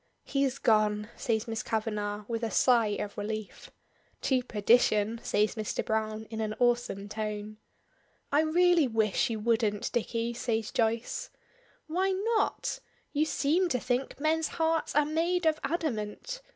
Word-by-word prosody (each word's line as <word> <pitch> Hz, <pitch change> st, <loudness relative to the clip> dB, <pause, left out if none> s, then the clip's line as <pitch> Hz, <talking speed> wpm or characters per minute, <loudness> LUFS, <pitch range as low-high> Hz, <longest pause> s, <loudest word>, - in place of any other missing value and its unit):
"He's 275 Hz, -1 st, 0 dB
gone!" 215 Hz, -3 st, +2 dB
says 220 Hz, -1 st, -1 dB
Miss 225 Hz, -1 st, -2 dB
Kavanagh, 210 Hz, -2 st, -2 dB
with 230 Hz, -1 st, -2 dB
a 230 Hz, -, -1 dB
sigh 230 Hz, -3 st, +3 dB
of 205 Hz, -, -5 dB
relief. 215 Hz, 0 st, -5 dB, 0.5 s
"To 260 Hz, -2 st, +2 dB
perdition!" 220 Hz, -1 st, +2 dB
says 210 Hz, +1 st, +1 dB
Mr. 215 Hz, -3 st, -3 dB
Browne 220 Hz, 0 st, -1 dB
in 220 Hz, 0 st, -3 dB
an 215 Hz, 0 st, -2 dB
awesome 240 Hz, -5 st, +1 dB
tone. 215 Hz, 0 st, -4 dB, 0.7 s
"I 290 Hz, +2 st, +4 dB
really 340 Hz, -1 st, +4 dB
wish 220 Hz, -3 st, +1 dB
you 225 Hz, -2 st, -2 dB
wouldn't, 215 Hz, -2 st, 0 dB
Dicky," 235 Hz, 0 st, -1 dB
says 225 Hz, -2 st, -2 dB
Joyce. 230 Hz, -2 st, -1 dB, 0.6 s
"Why 370 Hz, +5 st, 0 dB, 0.3 s
not? 425 Hz, -, 0 dB, 0.3 s
You 300 Hz, +1 st, +2 dB
seem 320 Hz, +4 st, +1 dB
to 250 Hz, -, +1 dB
think 250 Hz, +3 st, -2 dB
men's 315 Hz, +1 st, +1 dB
hearts 325 Hz, -1 st, +1 dB
are 295 Hz, 0 st, +4 dB
made 335 Hz, +3 st, 0 dB
of 315 Hz, -1 st, +3 dB
adamant! 315 Hz, -, -3 dB
230 Hz, 140 wpm, -29 LUFS, 215-295 Hz, 0.7 s, I